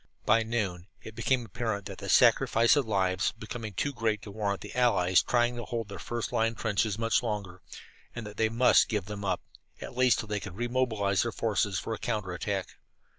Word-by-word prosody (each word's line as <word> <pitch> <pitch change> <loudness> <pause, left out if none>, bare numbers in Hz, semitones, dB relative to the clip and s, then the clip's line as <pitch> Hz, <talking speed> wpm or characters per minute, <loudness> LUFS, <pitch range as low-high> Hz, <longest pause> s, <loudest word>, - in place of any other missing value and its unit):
By 115 - +4
noon 100 -6 -2 0.2
it 110 - -9
became 120 +2 0
apparent 110 -1 -3
that 100 -2 -8
the - - -6
sacrifice 115 +4 +5
of 140 -5 +1
lives 95 -3 +1
was - - +2
becoming 110 -1 -7
too 140 +10 -1
great 110 -4 -1
to 105 - -8
warrant 100 -1 -2
the - - -8
Allies 95 -8 +3
trying 120 0 +1
to 120 - -4
hold 115 -4 -4
their 100 - -7
first 120 -1 -4
line 115 +1 +1
trenches 105 -1 0
much 115 0 +2
longer, 100 -6 -4 0.5
and 120 -2 -5
that 105 0 -9
they 110 -1 +2
must 120 +3 +4
give 105 -5 -1
them 105 0 -6
up, 95 -2 -1 0.4
at - - -8
least 125 -1 +4
until 110 - -5
they 105 -1 -1
could 100 -2 -8
re 120 +3 -2
mobilize 110 -6 +1
their 120 - -1
forces 105 -4 0
for 115 - -3
a 110 - -5
counter 95 -4 -2
attack. 95 +2 -3
110 Hz, 215 wpm, -29 LUFS, 100-115 Hz, 0.5 s, sacrifice